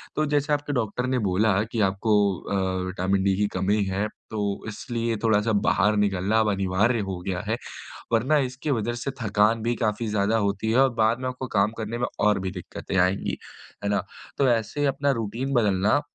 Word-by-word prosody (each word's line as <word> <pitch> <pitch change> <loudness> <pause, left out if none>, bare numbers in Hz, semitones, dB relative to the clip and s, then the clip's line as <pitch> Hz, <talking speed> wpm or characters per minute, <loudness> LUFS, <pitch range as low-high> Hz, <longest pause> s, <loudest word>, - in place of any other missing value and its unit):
तो 155 - +1
जैसे 145 +1 +1
आपके 145 0 -1
डॉक्टर 125 0 -1
ने 130 -1 +1
बोला 105 +3 +3 0.2
कि 115 - -2
आपको 100 +3 -2 0.3
अ, 95 -1 -1
विटामिन 95 +1 0
डी 100 -1 +2
की 105 0 +2
कमी 100 +2 +2
है 95 +2 -1 0.2
तो 100 -2 -2
इसलिए 115 +1 -3
थोड़ा-सा 110 0 +3 0.2
बाहर 105 +2 +3
निकलना 100 +1 +2
अब 110 -1 +2
अनिवार्य 100 +5 +1
हो 90 -2 -4
गया 90 -2 -1
है, 115 +2 0 0.6
वरना 130 +7 +3
इसकी 135 +4 -4
वजह 120 +3 -2
से 140 - -2
थकान 105 +1 +2
भी 120 +1 0
काफ़ी 110 -1 -1
ज़्यादा 105 +1 +1
होती 105 +3 -1
है 125 - +3
और 135 - +5
बाद 115 +2 +2
में 130 - -2
आपको 130 +1 -5
काम 100 +2 +3
करने 115 +1 -4
में 120 - 0 0.2
और 105 - +3
भी 95 0 -3
दिक्कतें 95 +1 -6
आएँगी, 90 +2 +1 0.5
है 100 - 0
ना। 100 - +1 0.3
तो 135 -2 +3
ऐसे 115 +5 0
अपना 140 -1 +1
रूटीन 120 +6 -3
बदलना 105 +2 +3
110 Hz, 195 wpm, -25 LUFS, 100-120 Hz, 0.6 s, और